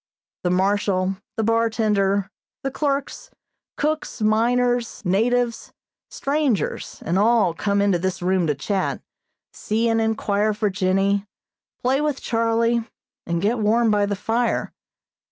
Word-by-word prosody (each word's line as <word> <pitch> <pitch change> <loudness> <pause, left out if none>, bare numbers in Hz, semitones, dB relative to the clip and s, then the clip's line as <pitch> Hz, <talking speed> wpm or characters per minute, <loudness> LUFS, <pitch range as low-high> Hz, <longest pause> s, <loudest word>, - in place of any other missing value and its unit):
The 180 - +1
Marshal, 190 0 +1 0.2
the 225 - +1
bartender, 215 -3 +1 0.3
the 270 - -2
clerks, 285 - -2 0.5
cooks, 305 0 -2
miners, 240 +2 +1
natives, 230 +5 0 0.4
strangers 280 -6 -1
and 175 +4 +1
all 215 -5 +3
come 200 +3 0
into 195 -4 +2
this 190 +1 -2
room 180 -1 +1
to 150 - +1
chat, 190 +7 -2 0.5
see 225 +2 -1
and 225 0 +2
inquire 215 -1 0
for 210 -1 0
Jennie, 195 +1 +1 0.6
play 265 +3 +2
with 300 -2 -1
Charlie, 230 0 +1 0.4
and 170 +1 -1
get 225 +4 +1
warm 220 +2 +3
by 205 -1 +2
the 200 - -1
fire. 230 +4 -1
215 Hz, 125 wpm, -22 LUFS, 195-235 Hz, 0.6 s, all